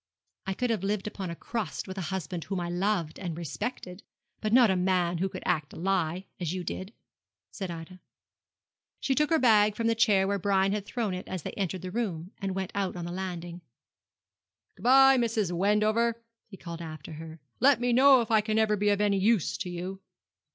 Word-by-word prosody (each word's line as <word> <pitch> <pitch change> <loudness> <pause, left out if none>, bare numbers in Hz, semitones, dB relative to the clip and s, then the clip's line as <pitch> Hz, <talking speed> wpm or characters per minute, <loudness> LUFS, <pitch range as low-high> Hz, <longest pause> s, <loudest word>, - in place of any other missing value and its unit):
'I 195 - -1
could 250 +3 -1
have 220 -5 0
lived 200 0 -1
upon 200 -3 -5
a 170 - -5
crust 225 +2 -4
with 190 - -6
a 190 - -4
husband 180 -3 -4
whom 195 -2 -3
I 175 -1 -3
loved 175 -3 -1
and 175 -4 -4
respected; 180 - -5 0.4
but 215 - -2
not 240 -3 +6
with 185 - +1
a - - 0
man 180 -2 +1
who 190 +2 0
could - - -8
act 150 -2 0
a - - -10
lie, 180 0 -1
as 175 0 -2
you 185 - -3
did,' 185 +3 -5 0.6
said 190 -3 -5
Ida. 170 +2 -8 1.0
She 270 - 0
took 300 +2 +2
her 325 - +4
bag 215 -6 +4
from 230 - -2
the 230 - +3
chair 205 -4 +3
where 200 0 0
Brian 195 0 +2
had 205 -1 -3
thrown 225 -6 -2
it 180 - -6
as 185 -4 -5
they - - -4
entered 185 -2 -3
the 185 - -5
room, 185 -6 -3
and 195 -1 -3
went 190 -1 -3
out 195 -2 -2
on 175 -1 -5
the 175 - -5
landing. 175 -2 -5 1.1
'Good - - -17
bye, 270 +2 +7
Mrs. 225 -6 0
Wendover,' 215 +5 +2 0.3
he 195 - -12
called 170 -2 -8
after 160 -1 -8
her; 160 +1 -9 0.2
'let 270 +2 +5
me 245 0 +1
know 265 +1 +7
if 230 - -4
I 220 -1 +5
can 215 0 -1
ever 220 -1 +3
be 205 0 +1
of 205 0 +2
any 200 -1 +2
use 210 -2 +2
to 190 - -3
you.' 180 +2 -5
195 Hz, 215 wpm, -28 LUFS, 180-215 Hz, 1.1 s, bye